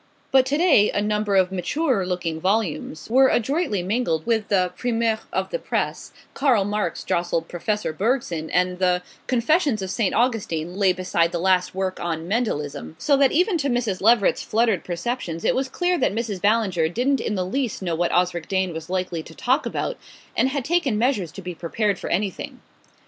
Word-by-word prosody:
But 265 Hz, -1 st, +5 dB
to 285 Hz, +2 st, +1 dB
day 310 Hz, -, +5 dB
a -, -, -1 dB
number 210 Hz, -1 st, 0 dB
of 190 Hz, -1 st, +3 dB
maturer 195 Hz, -, 0 dB
looking 170 Hz, -3 st, -3 dB
volumes 185 Hz, -6 st, -1 dB
were 265 Hz, +3 st, +5 dB
adroitly 240 Hz, -, 0 dB
mingled 180 Hz, -6 st, -1 dB
with 220 Hz, -3 st, 0 dB
the 185 Hz, -3 st, +2 dB
primeurs 230 Hz, -2 st, 0 dB
of -, -, -2 dB
the -, -, -1 dB
press -, -, -3 dB, 0.2 s
Karl 250 Hz, -8 st, +2 dB
Marx 205 Hz, -3 st, -2 dB
jostled 170 Hz, -1 st, -1 dB
Professor 210 Hz, 0 st, -2 dB
Bergson, 180 Hz, -, -1 dB
and 180 Hz, 0 st, +1 dB
the 180 Hz, -1 st, +2 dB, 0.2 s
"Confessions 255 Hz, -, +2 dB
of 185 Hz, -, -4 dB
St. 215 Hz, -5 st, 0 dB
Augustine" 195 Hz, -9 st, 0 dB
lay 195 Hz, -2 st, +3 dB
beside 180 Hz, -2 st, 0 dB
the 175 Hz, -, -2 dB
last 180 Hz, +1 st, +1 dB
work 190 Hz, -1 st, -2 dB
on 165 Hz, -1 st, -3 dB
"Mendelism"; 155 Hz, -, -2 dB
so 280 Hz, -, +2 dB
that 275 Hz, -1 st, +4 dB
even 355 Hz, +2 st, +2 dB
to 285 Hz, -1 st, 0 dB
Mrs. 240 Hz, -6 st, -1 dB
Leveret's 220 Hz, 0 st, +4 dB
fluttered 220 Hz, -4 st, +1 dB
perceptions 175 Hz, -2 st, -4 dB
it -, -, +3 dB
was 265 Hz, 0 st, -1 dB
clear 355 Hz, +4 st, 0 dB
that -, -, +1 dB
Mrs. 220 Hz, -5 st, -3 dB
Ballinger 200 Hz, -6 st, +2 dB
didn't 250 Hz, +8 st, 0 dB
in 210 Hz, -, -2 dB
the 185 Hz, -2 st, -1 dB
least 235 Hz, 0 st, -2 dB
know 175 Hz, -2 st, -1 dB
what 170 Hz, +1 st, 0 dB
Osric 175 Hz, -2 st, +1 dB
Dane 190 Hz, -2 st, 0 dB
was 160 Hz, +1 st, -7 dB
likely 180 Hz, -3 st, -2 dB
to 160 Hz, +1 st, -13 dB
talk 260 Hz, +4 st, +1 dB
about, -, -, -3 dB, 0.4 s
and 260 Hz, -, +2 dB
had 270 Hz, -2 st, -3 dB
taken 310 Hz, -9 st, +1 dB
measures 215 Hz, -, 0 dB
to 195 Hz, -, -9 dB
be 180 Hz, 0 st, -5 dB
prepared 195 Hz, +4 st, -1 dB
for -, -, -5 dB
anything. 195 Hz, 0 st, -2 dB
200 Hz, 185 wpm, -23 LUFS, 180-245 Hz, 0.4 s, But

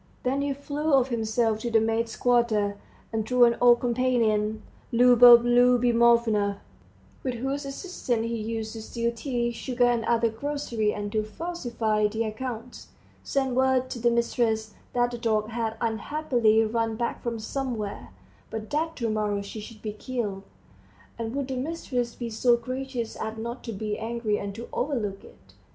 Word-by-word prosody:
Then 270 Hz, +2 st, 0 dB
he 285 Hz, 0 st, 0 dB
flew 285 Hz, +2 st, 0 dB
off 265 Hz, -1 st, +3 dB
himself 225 Hz, -1 st, 0 dB
to 235 Hz, -, -3 dB
the 225 Hz, -1 st, +4 dB
maids' 225 Hz, +1 st, 0 dB
quarter, 230 Hz, -5 st, +2 dB, 0.4 s
and 220 Hz, -1 st, 0 dB
through 250 Hz, +3 st, +3 dB
an 235 Hz, 0 st, +3 dB
old 240 Hz, -1 st, +6 dB
companion, 230 Hz, -4 st, +1 dB, 0.3 s
Liubov 240 Hz, 0 st, +8 dB
Liubimovna, 235 Hz, -4 st, +4 dB, 0.6 s
with 255 Hz, -2 st, -2 dB
whose 270 Hz, +4 st, -3 dB
assistance 275 Hz, -, -3 dB
he 230 Hz, 0 st, -2 dB
used 220 Hz, 0 st, -4 dB
to 225 Hz, -, -7 dB
steal 235 Hz, +1 st, -2 dB
tea, 240 Hz, 0 st, -1 dB
sugar, 245 Hz, +1 st, 0 dB
and 240 Hz, -1 st, +2 dB
other 235 Hz, 0 st, +3 dB
groceries 230 Hz, -3 st, -2 dB
and 205 Hz, 0 st, -4 dB
to 215 Hz, -, +1 dB
falsify 225 Hz, -5 st, -1 dB
the 220 Hz, +2 st, -2 dB
accounts, 230 Hz, +2 st, -6 dB, 0.4 s
sent 265 Hz, -2 st, 0 dB
word 260 Hz, 0 st, +2 dB
to 240 Hz, -, -4 dB
the 240 Hz, +1 st, +3 dB
mistress 230 Hz, -2 st, 0 dB, 0.2 s
that 245 Hz, 0 st, +2 dB
the 240 Hz, -, -6 dB
dog 215 Hz, -2 st, 0 dB
had 225 Hz, -1 st, -3 dB
unhappily 225 Hz, -1 st, +1 dB
run 225 Hz, 0 st, -1 dB
back 235 Hz, +1 st, -3 dB
from 235 Hz, -1 st, -3 dB
somewhere, 220 Hz, -3 st, -4 dB, 0.4 s
but 220 Hz, -1 st, -6 dB
that 320 Hz, +2 st, -1 dB
to 235 Hz, -, -2 dB
morrow 210 Hz, -2 st, -1 dB
she 200 Hz, +2 st, -7 dB
should 215 Hz, 0 st, -11 dB
be 210 Hz, -2 st, -3 dB
killed, 215 Hz, -4 st, -4 dB, 0.8 s
and 230 Hz, +2 st, -3 dB
would 280 Hz, -2 st, -2 dB
the 265 Hz, -, -3 dB
mistress 255 Hz, -4 st, -3 dB
be 240 Hz, -, -5 dB
so 235 Hz, +2 st, +3 dB
gracious 255 Hz, -1 st, -4 dB
as 220 Hz, 0 st, -4 dB
not 235 Hz, +3 st, -5 dB
to 230 Hz, -, -5 dB
be 210 Hz, 0 st, -3 dB
angry 225 Hz, -2 st, -1 dB
and 200 Hz, -1 st, -5 dB
to 235 Hz, +2 st, -7 dB
overlook 225 Hz, -8 st, -2 dB
it. -, -, -18 dB
235 Hz, 165 wpm, -26 LUFS, 220-250 Hz, 0.8 s, Liubov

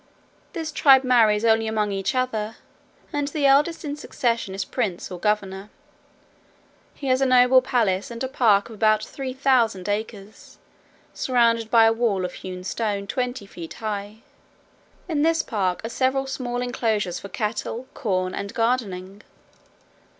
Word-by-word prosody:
This 325 Hz, -3 st, -4 dB
tribe 270 Hz, -3 st, +6 dB
marries 230 Hz, -4 st, +4 dB
only 225 Hz, 0 st, +3 dB
among 215 Hz, -2 st, 0 dB
each 195 Hz, +4 st, -2 dB
other, 225 Hz, -4 st, -1 dB, 0.6 s
and 290 Hz, -1 st, -1 dB
the 290 Hz, 0 st, -1 dB
eldest 295 Hz, +5 st, +3 dB
in 290 Hz, -1 st, -3 dB
succession 235 Hz, -9 st, -2 dB
is 195 Hz, 0 st, -3 dB
prince 205 Hz, -10 st, -3 dB
or 180 Hz, -, -6 dB
governor. 200 Hz, -1 st, -1 dB, 1.3 s
He 285 Hz, -, -9 dB
has 255 Hz, +1 st, +2 dB
a -, -, +4 dB
noble 255 Hz, 0 st, +6 dB
palace, 225 Hz, -7 st, 0 dB
and 235 Hz, +1 st, -6 dB
a -, -, 0 dB
park 220 Hz, -6 st, +3 dB
of -, -, -9 dB
about 215 Hz, 0 st, +2 dB
three 270 Hz, -2 st, -6 dB
thousand 245 Hz, -8 st, +1 dB
acres, 205 Hz, 0 st, -5 dB, 0.6 s
surrounded 230 Hz, -3 st, +1 dB
by 225 Hz, -1 st, +6 dB
a 225 Hz, -, +4 dB
wall 220 Hz, -5 st, 0 dB
of 180 Hz, -, -5 dB
hewn 185 Hz, -1 st, -8 dB
stone 200 Hz, 0 st, -2 dB
twenty 250 Hz, +1 st, -3 dB
feet 170 Hz, -4 st, -9 dB
high. 210 Hz, 0 st, -5 dB, 0.8 s
In 310 Hz, -4 st, 0 dB
this 325 Hz, +1 st, +2 dB
park 195 Hz, -3 st, -2 dB
are -, -, -3 dB
several 265 Hz, +2 st, 0 dB
small 245 Hz, -2 st, -3 dB
enclosures 220 Hz, -7 st, -1 dB
for 200 Hz, -, -9 dB
cattle, 220 Hz, +4 st, -3 dB
corn, 185 Hz, -7 st, -1 dB
and 200 Hz, 0 st, -5 dB
gardening. 205 Hz, -5 st, -1 dB
225 Hz, 150 wpm, -23 LUFS, 200-255 Hz, 1.3 s, tribe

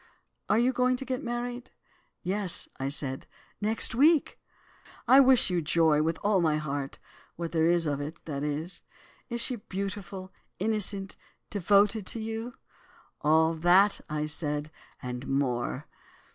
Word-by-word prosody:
Are 215 Hz, -, +4 dB
you 245 Hz, +3 st, +3 dB
going 250 Hz, 0 st, +2 dB
to 270 Hz, -, -7 dB
get 255 Hz, -1 st, -3 dB
married?' 240 Hz, +1 st, -4 dB, 0.5 s
"'Yes,' 190 Hz, -1 st, 0 dB, 0.2 s
said 140 Hz, -1 st, -3 dB
I, -, -, -31 dB, 0.3 s
'next 220 Hz, +2 st, +2 dB
week.' 295 Hz, +5 st, +3 dB, 0.7 s
"'I 260 Hz, +3 st, +8 dB
wish 260 Hz, -7 st, +5 dB
you 175 Hz, -1 st, +1 dB
joy, 155 Hz, -1 st, +3 dB
with 160 Hz, +1 st, 0 dB
all 205 Hz, -2 st, +3 dB
my 155 Hz, -2 st, +2 dB
heart, 145 Hz, -2 st, -4 dB, 0.4 s
what 170 Hz, -1 st, -5 dB
there 160 Hz, -1 st, +2 dB
is 170 Hz, -1 st, +3 dB
of 145 Hz, -2 st, -1 dB
it, 155 Hz, +4 st, -6 dB
that 140 Hz, -3 st, -4 dB
is. 150 Hz, +5 st, -3 dB, 0.5 s
Is 235 Hz, -1 st, -2 dB
she 250 Hz, 0 st, -1 dB
beautiful, 195 Hz, -2 st, -6 dB, 0.2 s
innocent, 200 Hz, -1 st, -1 dB, 0.3 s
devoted 205 Hz, +1 st, +2 dB
to 230 Hz, -, -5 dB
you?' 225 Hz, +3 st, -5 dB, 0.7 s
"'All 160 Hz, +2 st, +4 dB
that,' 180 Hz, +5 st, +4 dB, 0.2 s
said 150 Hz, -1 st, -2 dB, 0.3 s
I, -, -, -5 dB
'and 125 Hz, +1 st, -5 dB
more. 130 Hz, 0 st, -1 dB
185 Hz, 145 wpm, -28 LUFS, 155-225 Hz, 0.7 s, I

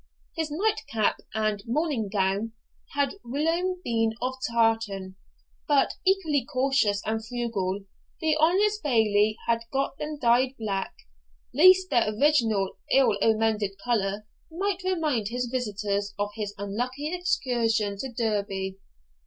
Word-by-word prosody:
His 320 Hz, -2 st, -2 dB
night 400 Hz, +9 st, 0 dB
cap 220 Hz, -2 st, +1 dB, 0.2 s
and 215 Hz, -2 st, 0 dB
morning 255 Hz, -5 st, 0 dB
gown, 200 Hz, +2 st, 0 dB, 0.4 s
had 285 Hz, -1 st, +1 dB
whilome 330 Hz, +8 st, -1 dB
been 225 Hz, -3 st, +1 dB
of 255 Hz, +1 st, -1 dB, 0.2 s
tartan, 225 Hz, -5 st, 0 dB, 0.5 s
but, 285 Hz, -2 st, +3 dB
equally 360 Hz, -8 st, +2 dB
cautious 255 Hz, -6 st, +1 dB
and 220 Hz, +1 st, -1 dB
frugal, 220 Hz, -5 st, -2 dB, 0.4 s
the 315 Hz, -1 st, +2 dB
honest 405 Hz, +6 st, +3 dB
Bailie 215 Hz, -5 st, +2 dB
had 230 Hz, 0 st, +1 dB
got 275 Hz, 0 st, -1 dB
them 300 Hz, 0 st, -4 dB
dyed 255 Hz, +1 st, +3 dB
black, 200 Hz, -3 st, -3 dB, 0.6 s
lest 370 Hz, +5 st, +6 dB
their 235 Hz, -5 st, +3 dB
original 225 Hz, -10 st, +2 dB
ill 265 Hz, -5 st, +4 dB
omened 220 Hz, -1 st, +2 dB, 0.2 s
colour 210 Hz, -3 st, 0 dB, 0.3 s
might 385 Hz, +3 st, -2 dB
remind 310 Hz, -, 0 dB
his 245 Hz, +3 st, -2 dB
visitors 205 Hz, -4 st, -2 dB
of 205 Hz, 0 st, -2 dB
his 205 Hz, -2 st, -5 dB
unlucky 250 Hz, -, -3 dB
excursion 235 Hz, -, 0 dB
to 265 Hz, +2 st, -4 dB
Derby. 200 Hz, -4 st, -2 dB
235 Hz, 125 wpm, -26 LUFS, 210-295 Hz, 0.6 s, lest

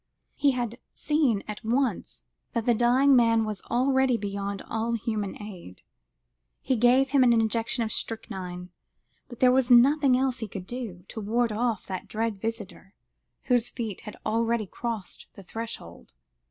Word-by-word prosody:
He 280 Hz, -2 st, +2 dB
had 240 Hz, -1 st, -3 dB, 0.2 s
seen 290 Hz, -9 st, +1 dB
at 210 Hz, +2 st, -7 dB
once 235 Hz, -, -1 dB, 0.3 s
that 230 Hz, -1 st, -1 dB
the 240 Hz, -, +4 dB
dying 250 Hz, +4 st, +4 dB
man 230 Hz, -2 st, +4 dB
was 210 Hz, -2 st, -4 dB
already 260 Hz, 0 st, +2 dB
beyond 200 Hz, -1 st, -4 dB
all 225 Hz, +1 st, -2 dB
human 215 Hz, -3 st, -3 dB
aid; 185 Hz, -, -10 dB, 0.8 s
he 260 Hz, -, 0 dB
gave 250 Hz, +3 st, +4 dB
him 275 Hz, -2 st, +5 dB
an 245 Hz, -, +5 dB
injection 230 Hz, +1 st, +1 dB
of 220 Hz, -, -3 dB
strychnine, 180 Hz, -6 st, -5 dB, 0.6 s
but 240 Hz, -, -12 dB
there 255 Hz, -1 st, +6 dB
was 260 Hz, -1 st, +2 dB
nothing 260 Hz, +2 st, +6 dB
else 260 Hz, -1 st, 0 dB
he 220 Hz, -, -4 dB
could 190 Hz, -2 st, -7 dB
do, 220 Hz, -7 st, -7 dB
to 220 Hz, -, -6 dB
ward 230 Hz, +3 st, +1 dB
off 225 Hz, -1 st, -1 dB
that 185 Hz, -1 st, -6 dB
dread 220 Hz, -2 st, -2 dB
visitor, 210 Hz, -3 st, -6 dB, 0.5 s
whose 245 Hz, -2 st, +2 dB
feet 225 Hz, -6 st, -5 dB
had 210 Hz, -, -9 dB
already 230 Hz, 0 st, +1 dB
crossed 225 Hz, 0 st, -5 dB
the 195 Hz, -, -11 dB
threshold. 85 Hz, -, -8 dB
230 Hz, 155 wpm, -27 LUFS, 210-245 Hz, 0.8 s, there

